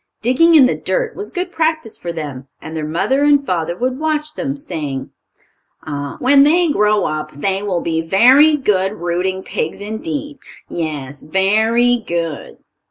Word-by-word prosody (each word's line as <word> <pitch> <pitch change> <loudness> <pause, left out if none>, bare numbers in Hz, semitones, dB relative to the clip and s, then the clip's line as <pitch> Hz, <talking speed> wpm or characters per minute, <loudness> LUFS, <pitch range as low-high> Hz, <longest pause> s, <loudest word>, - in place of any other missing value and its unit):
Digging 325 +8 +4
in 285 -4 +8
the 255 - +2
dirt - - -2
was 415 - -6
good 365 -1 -4
practice 315 -9 -1
for 170 - -6
them, 145 -5 -7
and 160 +1 -9
their 155 -1 -3
mother 260 - 0
and 290 -1 +4
father 170 -3 -2
would 255 +3 -2
watch 310 -1 -1
them, 275 -1 -4
saying: 150 - -5 0.7
"Ah, 145 -2 -5
when 275 +2 +5
they 325 +3 +4
grow 210 -4 +2
up 155 0 -3
they 190 +7 -1
will 190 -4 -2
be 160 -1 -1
very 255 - +5
good 200 -7 +1
rooting 185 +1 -2
pigs 160 - -4
indeed. 285 +7 -5 0.3
Yes, 145 -4 -5
very 220 +8 +2
good!" 170 -8 -4
210 Hz, 160 wpm, -17 LUFS, -, 0.7 s, in